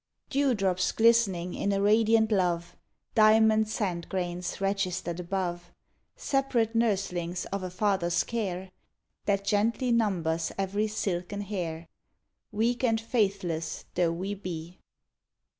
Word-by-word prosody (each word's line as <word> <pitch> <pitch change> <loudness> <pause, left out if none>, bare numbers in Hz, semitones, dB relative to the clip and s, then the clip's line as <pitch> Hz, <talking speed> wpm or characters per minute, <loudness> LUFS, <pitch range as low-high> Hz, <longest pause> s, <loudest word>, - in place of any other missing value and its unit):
Dewdrops 205 -10 +1
glistening 215 -6 +3
in 200 - -1
a 195 - +1
radiant 220 +2 +4
love; 175 -4 0 0.4
Diamond 220 0 +5
sand 185 -6 -2
grains 180 -1 -3
registered 185 -3 -1
above; 175 -1 -3 0.4
Separate 270 - 0
nurslings 185 -6 0
of 200 - -2
a 185 - -4
Father's 185 -2 +1
care, 190 -5 -3 0.5
That 200 -1 +1
gently 225 +5 +1
numbers 175 -8 +1
every 200 +2 0
silken 200 -2 -3
hair, 170 -5 -4 0.6
Weak 230 +4 0
and 225 -3 +3
faithless 195 -8 -1
though 175 -2 +2
we 185 +4 -3
be. 180 -3 -7
195 Hz, 110 wpm, -28 LUFS, 175-220 Hz, 0.6 s, Diamond